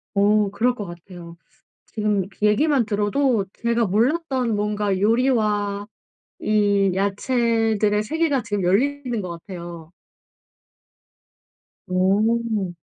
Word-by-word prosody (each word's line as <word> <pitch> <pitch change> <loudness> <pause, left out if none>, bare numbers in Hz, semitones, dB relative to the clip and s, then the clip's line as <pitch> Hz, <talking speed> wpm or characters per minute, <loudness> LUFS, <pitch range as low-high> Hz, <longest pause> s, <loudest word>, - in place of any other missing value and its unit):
어 205 0 +3
그럴 245 +4 +1
것 210 - -6
같아요. 175 -1 -11 0.5
지금 210 -3 -1 0.2
얘기만 240 +5 +3
들어도 210 +2 +1 0.2
제가 235 0 +1
몰랐던 250 - 0
뭔가 205 -2 -1
요리와 210 -3 +1 0.5
이 205 -2 +2
야채들의 215 +1 +1
세계가 290 0 0
지금 205 -2 -2
열리는 250 +6 0
것 180 - -6
같아요. 170 -2 -9 2.0
어. 205 +1 +1
210 Hz, 200 characters per minute, -22 LUFS, 195-235 Hz, 2.0 s, 어